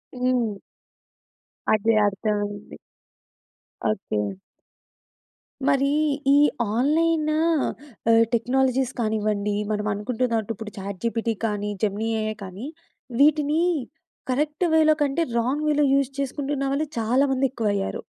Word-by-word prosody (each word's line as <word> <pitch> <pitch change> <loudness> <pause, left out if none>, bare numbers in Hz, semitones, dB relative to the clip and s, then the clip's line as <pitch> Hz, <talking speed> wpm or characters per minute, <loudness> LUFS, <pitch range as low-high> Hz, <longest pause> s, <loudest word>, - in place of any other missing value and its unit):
హ్మ్. 250 -4 0 1.2
అదే. 220 +1 +3
అర్థమైంది. 205 0 -3 1.1
ఓకే. 190 - -1 1.5
మరీ 275 +1 +3 0.4
ఈ - - +6 0.4
ఆన్‌లైన్ 310 +4 +2
ఆహ్, 275 -8 +1
టెక్నాలజీస్ 260 +2 +1
కానివ్వండి, 210 -2 0 0.2
మనం 210 0 -1
అనుకుంటున్నట్టు 225 +1 -1
ఇప్పుడు 220 -1 -8
చాట్‌‌ 195 -1 -6
జీపిటీ 230 0 0
కానీ, 210 -1 -2
జెమినీ 215 +2 0
ఎ‌ఐ 215 0 -2
కానీ, 195 +7 -7 0.5
వీటిని 300 +1 +4 0.7
కరెక్ట్ 300 +6 0
వే‌లో 310 -1 +5
కంటే, 290 +3 +1 0.2
రాంగ్ 270 +6 -1
వే‌లో 295 -1 +3
యూజ్ 275 -1 +2
చేసుకుంటున్న 275 0 -2
వాళ్ళు 305 +3 -1
చాలా 240 +5 +2
మంది 265 +1 +2
ఎక్కువయ్యారు. 205 -6 -2
245 Hz, 100 wpm, -24 LUFS, 215-280 Hz, 1.5 s, ఈ